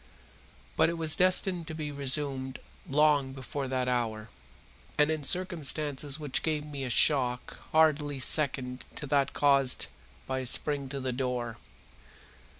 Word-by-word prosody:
But - - +4
it 170 - -4
was 160 -2 +2
destined 185 -2 +3
to 160 - -7
be 150 -2 -5
resumed 135 -2 0 0.3
long 145 -2 +2
before 135 +1 -6
that 130 -1 -2
hour, 115 -3 -2 0.7
and 150 +1 +3
in 155 -2 -3
circumstances 150 -5 0
which 145 -4 -2
gave 155 -2 -2
me 145 -2 -7
a 130 - -4
shock 125 -1 +1
hardly 150 -2 +2
second 130 -2 +2
to - - -6
that 140 -1 0
caused 140 -3 +3 0.4
by 130 0 -3
his 130 -2 -1
spring 140 -2 0
to 140 +1 -5
the 130 -1 -3
door. 125 -3 -4
140 Hz, 145 wpm, -28 LUFS, 130-150 Hz, 0.7 s, But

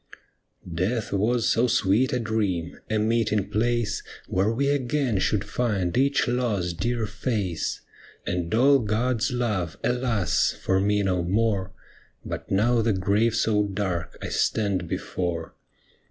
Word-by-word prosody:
' 85 - -14
Death 115 -1 -2
was 115 +4 +1
so 120 +2 +3
sweet 110 +3 +2
a 125 - +1
dream, 100 -7 -2
a 110 - +1
meeting 110 -2 +1
place 120 +1 0 0.3
Where 95 +3 +1
we 140 +5 0
again 135 -5 0
should 100 +1 +1
find 100 -5 -1
each 140 +2 +2
lost, 105 -9 -1
dear 120 0 0
face. 105 -5 -2 0.4
And 90 -1 -2
all 135 +4 +5
God's 115 +2 0
love, 105 - -1
alas! 125 -6 +1
for 95 0 +1
me 105 +1 +2
no 90 -2 +1
more, 100 0 0 0.5
But - - -6
now 115 +4 +3
the 110 -1 +2
grave 105 +4 +1
so 110 -2 +2
dark 95 -4 -3
I - - -3
stand 100 -5 0
before. 85 -2 -3
105 Hz, 140 wpm, -25 LUFS, 95-120 Hz, 0.5 s, all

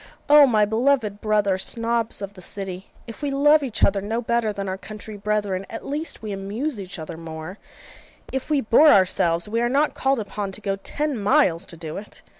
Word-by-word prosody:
O 295 -1 +8
my 215 -4 +3
beloved 220 -2 +1
brother 205 -3 +1
Snobs 230 0 -1
of 200 0 -6
the 185 - -13
City, 190 0 -4 0.2
if 230 - -10
we 290 - -1
love 295 +2 +4
each 255 -6 -3
other 195 0 +3
no 220 +4 -2
better 235 -2 0
than 200 -1 -5
our 190 - -2
country 215 +1 -9
brethren, 205 -2 -1
at 225 - -7
least 295 -3 -4
we 215 - -4
amuse 205 +6 -3
each 190 0 -8
other 160 0 -7
more; 160 +3 -8 0.7
if 265 +2 -3
we 295 -3 +2
bore 275 +7 +6
ourselves, 175 - +3
we 230 +2 -1
are 240 - +1
not 285 +4 +2
called 270 -1 +1
upon 205 -1 -4
to - - -6
go 195 -1 -1
ten 290 +5 -2
miles 200 - +3
to 170 - -9
do 160 -1 -6
it! 210 - -10
210 Hz, 205 wpm, -23 LUFS, 195-250 Hz, 0.7 s, O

